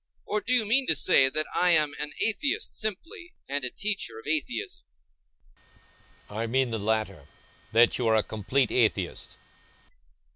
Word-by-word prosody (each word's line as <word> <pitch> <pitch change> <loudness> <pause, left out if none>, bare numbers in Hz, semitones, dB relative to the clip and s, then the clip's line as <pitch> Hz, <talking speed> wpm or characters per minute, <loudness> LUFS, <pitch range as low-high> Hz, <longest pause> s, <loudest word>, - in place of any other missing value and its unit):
Or, 210 0 -1
do 245 - -5
you 245 -3 +3
mean 255 +5 +2
to 160 - +4
say 135 -1 +5
that 155 +3 -2
I 180 - +3
am 155 -4 +4
an 150 0 -4
atheist 250 +6 0
simply, 320 - -5
and 140 0 -2
a 125 - 0
teacher 200 - -3
of 110 - -12
atheism?I 105 - -8
mean 130 +1 0
the 110 - -3
latter—that 110 - -1
you 120 - 0
are 110 - +3
a 110 - +2
complete 110 +4 -1
atheist. 105 -7 -1
130 Hz, 145 wpm, -26 LUFS, 110-180 Hz, -, say